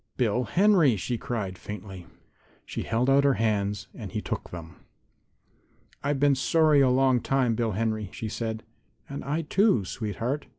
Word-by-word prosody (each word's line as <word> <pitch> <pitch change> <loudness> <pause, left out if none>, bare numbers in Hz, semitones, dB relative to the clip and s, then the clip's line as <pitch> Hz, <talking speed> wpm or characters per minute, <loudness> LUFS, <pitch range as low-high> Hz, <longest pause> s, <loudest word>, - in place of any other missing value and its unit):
"Bill 125 0 +1
Henry!" 180 - +4
she 115 +4 -3
cried, 110 -8 -4
faintly. 95 -3 -8 0.6
She - - -5
held 115 +3 0
out 135 +1 +5
her 140 -2 +3
hands 105 -2 -1
and 105 -5 -8
he 110 - -2
took - - -5
them. 85 -2 -9 1.3
"I've 140 0 0
been 145 0 +4
sorry 150 +2 +3
a 130 - +4
long 130 0 +3
time, 130 -2 +1
Bill 115 -1 -1
Henry," 110 -1 -1
she 110 - -5
said. 110 0 -4 0.4
"And 140 0 -6
I, 150 +4 -2
too, 180 - +2
sweetheart." 115 +8 -3
120 Hz, 160 wpm, -27 LUFS, 105-140 Hz, 1.3 s, out